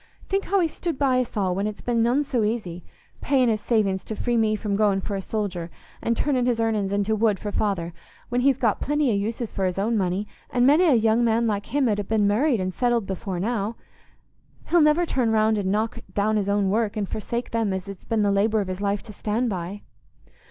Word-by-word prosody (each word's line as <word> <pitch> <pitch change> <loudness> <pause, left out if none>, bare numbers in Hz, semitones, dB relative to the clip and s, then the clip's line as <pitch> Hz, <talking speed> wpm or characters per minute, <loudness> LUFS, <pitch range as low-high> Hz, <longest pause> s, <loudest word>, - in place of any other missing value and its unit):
Think 390 +1 0
how 395 +1 +2
he's 330 -3 0
stood 340 -5 -3
by 260 -3 +2
us 245 -3 -3
all 190 -3 +1
when 200 +3 -1
it's 215 - -7
been 235 -2 +1
none 245 +5 +2
so 255 -5 -1
easy—paying 220 - -2
his 215 -1 0
savings 200 -5 +1
to 220 - -5
free 240 +3 -1
me 220 -2 +2
from 210 -1 -2
going 205 -2 +2
for 200 +1 -4
a 195 - -3
soldier, 190 -5 -3 0.3
an' 230 - 0
turnin' 255 -1 +1
his 240 -2 +1
earnin's 215 -4 0
into 205 +2 +1
wood 215 -2 +2
for 205 - -5
father, 185 -5 -1 0.4
when 245 +1 0
he's 270 -1 +3
got 230 -6 +1
plenty 295 -3 +1
o' - - +1
uses 220 +3 -2
for 195 - -2
his 185 -1 -1
money, 200 -2 0 0.2
and 245 0 +2
many 300 +7 +5
a 300 -7 +5
young 225 +1 +3
man 230 0 +2
like 205 -2 -1
him 275 +1 +1
'ud 210 -2 +1
ha' 205 - -4
been 215 -2 +2
married 235 +5 +2
and 185 0 -2
settled 240 -2 +1
before 190 -1 -4
now. 215 +2 -1 0.9
He'll 345 -1 +5
never 300 +3 +4
turn 255 -7 0
round 220 -1 +2
and 190 -1 -1
knock 215 +2 -1 0.2
down 210 +1 +1
his 200 -2 0
own 200 -1 +1
work, 220 0 0
and 205 -2 -1
forsake 235 +4 -4
them 225 -3 0
as 190 0 -4
it's 195 -2 -9
been 225 -2 0
the 200 - +2
labour 210 +2 +2
of 195 -2 -2
his 185 +1 -4
life 200 0 -1
to 215 - -11
stand 220 +4 -1
by." 185 +2 -5
215 Hz, 230 wpm, -24 LUFS, 200-240 Hz, 0.9 s, many